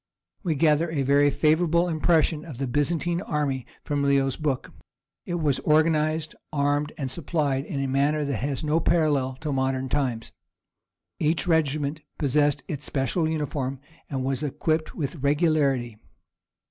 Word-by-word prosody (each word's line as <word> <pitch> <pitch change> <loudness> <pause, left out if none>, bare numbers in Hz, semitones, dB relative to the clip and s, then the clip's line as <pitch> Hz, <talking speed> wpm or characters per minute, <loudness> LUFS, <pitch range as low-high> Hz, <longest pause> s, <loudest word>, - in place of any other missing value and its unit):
We 170 -6 -1
gather 155 +2 +3
a 150 -4 -1
very 140 +2 +4
favourable 165 +4 +2
impression 160 -1 +2
of 150 -8 -9
the 135 - -2
Byzantine 165 +6 0
army 145 -7 -2 0.2
from 145 -1 -1
Leo's 140 -1 +2
book; 145 -5 -2 0.5
it 175 - -2
was 150 -6 +1
organized, 155 0 +2 0.2
armed, 145 0 0
and 135 -4 -3
supplied 145 -3 -1
in 150 -6 -4
a 135 - -1
manner 145 +3 +1
that 140 -4 -1
has 135 +4 -2
no 155 +2 +2
parallel 150 -6 +1
till 155 -3 -3
modern 130 0 0
times. 125 -5 -1 0.9
Each 160 +1 +1
regiment 155 -2 +1 0.2
possessed 145 0 +1
its 150 -5 -4
special 150 +5 0
uniform, 140 -4 -2 0.3
and 135 -2 -2
was 135 -1 -1
equipped 155 +2 -1
with 150 +1 -3
regularity. 140 -6 +1
145 Hz, 145 wpm, -25 LUFS, 135-155 Hz, 0.9 s, very